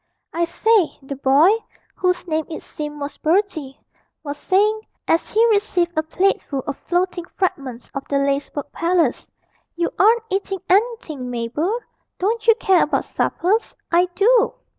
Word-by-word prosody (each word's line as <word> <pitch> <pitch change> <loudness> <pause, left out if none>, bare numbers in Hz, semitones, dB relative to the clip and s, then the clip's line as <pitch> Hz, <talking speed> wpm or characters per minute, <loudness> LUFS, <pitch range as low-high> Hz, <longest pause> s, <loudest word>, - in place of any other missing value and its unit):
'I 340 +1 +1
say,' 420 +1 +2
the 275 +1 -6
boy 275 +7 +5 0.4
(whose 360 0 -1
name, 315 -1 -1
it 320 - -6
seemed, 295 -1 -7
was 285 0 -5
Bertie) 315 -6 0 0.4
was 290 -2 -4
saying, 425 +3 +2 0.3
as 330 - +1
he 445 +2 +4
received 365 -5 +1
a 315 - +2
plateful 315 -5 0
of 285 - -3
floating 355 0 -1
fragments 270 - -3
of 275 - -5
the 280 - 0
lacework 280 +1 -1
palace, 335 -6 0 0.5
'you 340 0 -1
aren't 450 +3 +5
eating 390 0 -1
anything, 380 - 0
Mabel. 250 - -2 0.4
Don't 440 +4 -1
you 455 - +7
care 380 -5 +3
about 295 - +1
suppers? 415 +6 0 0.2
I 350 +1 +4
do.' 455 +3 +4
345 Hz, 145 wpm, -21 LUFS, 290-400 Hz, 0.5 s, you